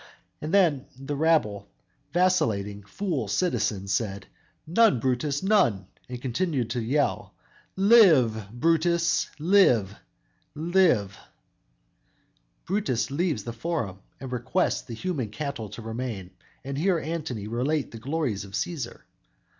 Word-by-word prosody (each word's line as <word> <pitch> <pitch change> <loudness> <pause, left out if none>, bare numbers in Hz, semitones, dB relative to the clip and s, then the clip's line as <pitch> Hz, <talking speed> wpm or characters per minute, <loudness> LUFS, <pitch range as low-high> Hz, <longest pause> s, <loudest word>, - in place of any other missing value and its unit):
And 155 - -4
then 170 -9 +3
the 135 +2 -4
rabble, 140 -11 +1 0.4
vacillating, 115 - +1
fool 160 - -3
citizens 100 - 0
said, 100 -2 -2 0.4
"None, 175 - +4
Brutus, 135 +5 -1
none," 120 - +3 0.2
and 125 -1 -5
continue 135 +3 -1
to 120 +1 -2
yell, 140 +6 -1 0.4
"Live, 160 - +5
Brutus, 165 +6 +1
live! 150 - +4 0.6
live!" 160 - +2 1.5
Brutus 150 - -1
leaves 150 - -1
the 115 - -5
Forum 115 - -3 0.2
and 130 -2 -7
requests 130 +9 0
the 115 - -8
human 140 - -3
cattle 140 -2 -5
to 110 +3 -9
remain 115 -5 -5 0.3
and 140 +1 -4
hear 180 +1 +2
Antony 155 -9 -4
relate 130 +6 -1
the 115 - -9
glories 135 -5 -2
of 100 -1 -12
Cæsar! 135 0 -4
135 Hz, 115 wpm, -26 LUFS, 110-165 Hz, 1.5 s, Live